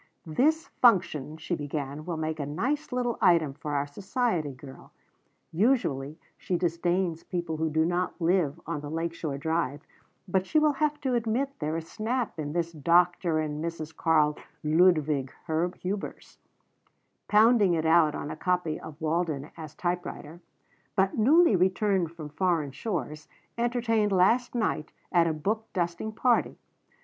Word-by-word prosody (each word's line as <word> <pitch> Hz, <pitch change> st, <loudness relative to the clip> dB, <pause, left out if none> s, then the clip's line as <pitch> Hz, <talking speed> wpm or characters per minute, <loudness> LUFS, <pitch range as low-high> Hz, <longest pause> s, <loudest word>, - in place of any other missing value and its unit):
"This 300 Hz, -, +2 dB
function," 165 Hz, -, +2 dB
she 175 Hz, -, -4 dB
began, 145 Hz, -1 st, -4 dB
"will 170 Hz, -2 st, -2 dB
make 155 Hz, 0 st, -3 dB
a 145 Hz, -, -2 dB
nice 275 Hz, -, -2 dB
little 245 Hz, -2 st, -1 dB
item 165 Hz, -5 st, +4 dB
for 145 Hz, +1 st, -5 dB
our 140 Hz, 0 st, +1 dB
society 190 Hz, -, -1 dB
girl. 135 Hz, 0 st, -13 dB, 0.6 s
Usually 160 Hz, -, +1 dB, 0.2 s
she 180 Hz, -, -1 dB
disdains 175 Hz, 0 st, 0 dB
people 170 Hz, -3 st, -3 dB
who 160 Hz, 0 st, 0 dB
do 160 Hz, +1 st, +2 dB
not 175 Hz, +2 st, -1 dB
live 170 Hz, -4 st, +1 dB
on 160 Hz, -2 st, -3 dB
the 145 Hz, -, -7 dB
Lake 165 Hz, +2 st, -2 dB
Shore 155 Hz, -4 st, -4 dB
Drive, 155 Hz, -1 st, -1 dB, 0.5 s
but 190 Hz, +1 st, 0 dB
she 310 Hz, -, +1 dB
will 305 Hz, -1 st, +5 dB
have 300 Hz, +1 st, -1 dB
to 265 Hz, -2 st, 0 dB
admit 240 Hz, +4 st, 0 dB
there 155 Hz, +1 st, -2 dB
is 165 Hz, 0 st, -6 dB
snap 230 Hz, -2 st, -3 dB
in 145 Hz, -1 st, -3 dB
this 170 Hz, -1 st, -1 dB
'Dr. 170 Hz, +2 st, +2 dB
and 155 Hz, 0 st, -3 dB
Mrs. 160 Hz, -2 st, -5 dB
Karl 150 Hz, -2 st, +2 dB, 0.2 s
Ludwig 155 Hz, -4 st, +3 dB
Hubers,'" 180 Hz, +4 st, -3 dB, 0.9 s
pounding 215 Hz, -4 st, +5 dB
it 160 Hz, -1 st, -1 dB
out 160 Hz, -2 st, +4 dB
on 145 Hz, -, -5 dB
a -, -, -5 dB
copy 180 Hz, -4 st, -1 dB
of 160 Hz, -1 st, -10 dB
Walden 155 Hz, -3 st, -1 dB
as 155 Hz, -2 st, -9 dB
typewriter 175 Hz, -2 st, -4 dB, 0.3 s
"' -, -, -38 dB
but 190 Hz, -1 st, +2 dB
newly 285 Hz, -, +5 dB
returned 185 Hz, -1 st, +2 dB
from 160 Hz, -3 st, -8 dB
foreign 160 Hz, -3 st, 0 dB
shores, 155 Hz, -, -4 dB, 0.3 s
entertained 235 Hz, -3 st, +1 dB
last 230 Hz, +7 st, +3 dB
night 215 Hz, -9 st, -1 dB, 0.2 s
at 170 Hz, -2 st, +4 dB
a -, -, +1 dB
book 215 Hz, +8 st, -2 dB
dusting 175 Hz, +4 st, -2 dB
party. 240 Hz, +2 st, +1 dB
170 Hz, 155 wpm, -28 LUFS, 155-205 Hz, 0.9 s, will